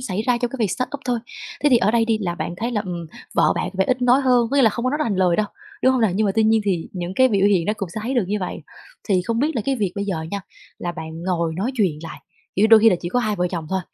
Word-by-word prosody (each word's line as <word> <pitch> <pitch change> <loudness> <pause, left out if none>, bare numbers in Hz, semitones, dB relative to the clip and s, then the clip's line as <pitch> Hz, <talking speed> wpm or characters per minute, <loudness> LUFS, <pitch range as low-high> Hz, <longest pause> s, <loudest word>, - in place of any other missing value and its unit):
xảy 210 -4 -3
ra 245 0 +1
cho 245 0 -1
cái 265 - -7
việc 215 -5 +1
startup 265 +2 -3
thôi. 245 -1 0 0.5
Thế - - +6
thì 250 - +7
ở 210 -2 +2
đây 230 0 +2
đi 225 -1 +1
là 175 -5 -2
bạn 175 - -4
thấy 230 +5 -2
là, 210 - 0
ừm, 175 -2 -5 0.3
vợ - - +4
bạn 180 - -2
vẻ 190 0 +2
ít 255 0 0
nói 250 +2 +5
hơn, 250 -3 +3
có 280 - 0
nghĩa 275 - +5
là 225 - +5
không 235 +4 -4
có 255 - +2
nói 295 - -1
ra 305 - 0
thành 205 -4 -1
lời 180 -2 +3
đâu, 215 - +1 0.4
đúng 260 - +5
hông 260 - +1
nè? 220 - +4
Nhưng 215 +2 +1
mà 195 - +1
tuy 225 - +3
nhiên 220 0 +4
thì 180 -5 -1
những 180 0 -5
cái 260 +3 +5
biểu 200 -3 +2
hiện 185 -5 +2
nó 210 - +2
cũng 195 - -4
sẽ 215 - -3
thấy 250 +5 -2
được 240 -6 +2
như 210 - 0
vậy. 180 - -4 0.5
Thì 185 -3 +2
không 230 +3 -2
biết 295 +3 0
là 225 - 0
cái 270 +1 0
việc 200 -6 -1
bây 200 - -2
giờ 185 -6 -3
nha, 200 - -3 0.4
là 175 - -3
bạn 160 -1 -8
ngồi 170 -3 -1
nói 210 +10 -2
chuyện 185 -10 0
lại, 165 - -8 0.4
kiểu 200 - +2
như, - - +7
đôi 220 0 +7
khi 225 +1 +6
là 180 - +2
chỉ 175 - -4
có 245 - 0
hai 215 -3 -1
vợ 180 0 0
chồng 170 -3 -5
thôi, 190 0 0
210 Hz, 335 wpm, -21 LUFS, 185-240 Hz, 0.5 s, thì